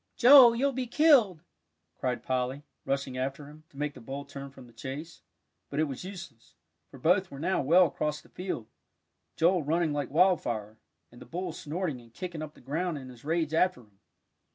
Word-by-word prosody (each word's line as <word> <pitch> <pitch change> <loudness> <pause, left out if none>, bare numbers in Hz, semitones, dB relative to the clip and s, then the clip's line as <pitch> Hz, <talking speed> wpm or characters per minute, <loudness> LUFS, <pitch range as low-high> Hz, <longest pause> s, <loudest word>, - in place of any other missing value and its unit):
"Joel, 250 -2 +9
you'll 275 +4 +1
be 255 -1 -3
killed!" 240 - +4 0.6
cried 125 -1 -2
Polly, 130 +2 -2 0.2
rushing 135 -1 -2
after 135 +2 -3
him, 155 +1 -15
to 140 - -19
make 150 0 -2
the - - -13
bull 135 +4 -6
turn 140 0 -8
from 135 -2 -14
the 120 - -18
chase. 135 +8 -8 0.5
But 140 - -3
it - - +4
was 140 -1 -4
useless; 170 - -10 0.3
for - - -13
both 180 +7 +2
were 140 - -9
now 175 +6 0
well 170 +7 +5
across 150 -1 -2
the - - -20
field, 180 - -5 0.7
Joel 175 +2 +3
running 160 +1 0
like 145 -2 -2
wildfire, 120 - +1 0.3
and 120 - -15
the - - -11
bull 180 +1 -4
snorting 155 -3 -4
and 115 -1 -19
kicking 170 +5 -6
up 155 -1 -7
the - - -17
ground 160 +5 -2
in 130 -2 -9
his 125 -2 -14
rage 160 0 -1
after 180 -4 +2
him. 105 -4 -25
150 Hz, 195 wpm, -29 LUFS, 135-180 Hz, 0.7 s, Joel